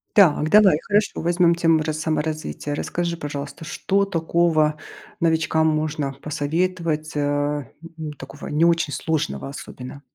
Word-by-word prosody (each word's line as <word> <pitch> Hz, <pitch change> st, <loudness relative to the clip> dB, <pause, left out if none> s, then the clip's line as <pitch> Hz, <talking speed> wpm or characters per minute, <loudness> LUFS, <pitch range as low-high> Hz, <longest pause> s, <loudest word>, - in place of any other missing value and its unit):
Так, 160 Hz, -6 st, +5 dB
давай, 205 Hz, -5 st, +6 dB
хорошо. 205 Hz, +1 st, 0 dB
Возьмем 170 Hz, 0 st, +3 dB
тему 165 Hz, -2 st, +3 dB
ра 155 Hz, 0 st, -2 dB
саморазвитие. 155 Hz, -1 st, -2 dB
Расскажи, 170 Hz, +2 st, -2 dB
пожалуйста, 145 Hz, 0 st, -6 dB
что 195 Hz, +5 st, 0 dB
такого 165 Hz, -4 st, +2 dB, 0.5 s
новичкам 160 Hz, -1 st, +2 dB
можно 155 Hz, -2 st, -1 dB
посоветовать, 155 Hz, +1 st, -1 dB
э, 145 Hz, 0 st, 0 dB, 0.3 s
ну, 155 Hz, -1 st, -5 dB
такого 135 Hz, +2 st, -9 dB
не 155 Hz, +3 st, +2 dB
очень 165 Hz, -3 st, +2 dB
сложного 130 Hz, -, -2 dB
особенно? 125 Hz, -, -9 dB
155 Hz, 125 wpm, -22 LUFS, 150-170 Hz, 0.5 s, давай